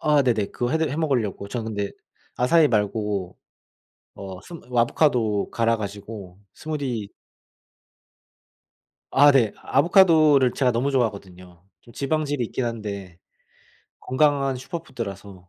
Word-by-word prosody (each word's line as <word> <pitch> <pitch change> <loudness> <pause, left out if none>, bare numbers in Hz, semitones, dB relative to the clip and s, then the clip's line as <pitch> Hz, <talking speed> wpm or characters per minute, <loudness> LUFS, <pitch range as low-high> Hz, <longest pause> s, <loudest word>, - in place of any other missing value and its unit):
아 150 -2 +3
네네. 110 -6 +1
그거 120 0 -2
해드 160 0 +1
해먹으려고 130 - -1
전 115 +1 -4
근데 100 -2 -3 0.5
아사이 150 +5 +4
말고 105 -4 -1 0.8
어 95 -2 -8
스무 125 - -6
아보카도 115 -5 +1
갈아 115 0 +1
가지고 100 -2 -8 0.2
스무디 135 -9 -4 2.0
아 145 +1 +6
네. 120 -7 +3
아보카도를 155 -4 +4
제가 130 -1 +1
너무 130 +5 0
좋아하거든요. 95 -8 -3 0.2
좀 120 - -18
지방질이 145 -1 -1
있긴 125 +3 -3
한데 100 -6 -6 0.8
건강한 140 0 +1
슈퍼푸드라서 105 - -8
120 Hz, 270 characters per minute, -23 LUFS, 100-140 Hz, 2.0 s, 아